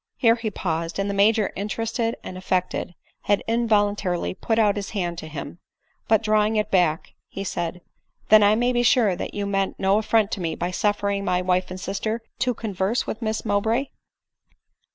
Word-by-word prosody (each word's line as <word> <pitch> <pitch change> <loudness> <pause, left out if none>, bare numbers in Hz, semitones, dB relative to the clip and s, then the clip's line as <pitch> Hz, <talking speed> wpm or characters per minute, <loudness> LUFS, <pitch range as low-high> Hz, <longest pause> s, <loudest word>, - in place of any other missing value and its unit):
" - - -64
Here 230 -3 +5
he 230 -2 -3
paused; 165 -4 -3
and 195 0 -1
the 200 - -1
Major 210 +1 +3
interested 225 +3 -2
and 185 - -7
affect 185 0 -1
ed, 175 - -4 0.3
had 205 -1 +2
involuntarily 205 -6 +1
put 225 +4 -1
out 210 -3 +3
his 200 -1 -4
hand 175 -2 -2
to 160 - -8
him; 155 +1 -7 0.5
but, 220 0 +3
draw 215 -1 +3
ing 215 +1 0
it 210 -1 0
back, 175 -3 +1
he 195 - -6
said, 175 -2 -3 0.2
" - - -39
then 215 0 +8
I 205 +1 +5
may 245 +2 +1
be 240 - +2
sure 225 -5 +4
that - - -6
you 205 -1 -2
meant 195 -1 -1
no 195 +1 +3
affi 220 +1 +3
ont 205 0 -6
to 195 - -3
,me 165 -2 -2
by 175 +1 -3
suffering 200 +1 0
my 180 -2 +1
wife 180 0 +1
and 185 +1 -6
sister 215 +5 -3 0.2
to 250 -2 +1
con 220 -2 -5
verse 190 +6 0
with 220 - -5
Miss 220 0 -2
Mowbray 225 +6 +1
205 Hz, 210 wpm, -24 LUFS, 185-220 Hz, 0.5 s, then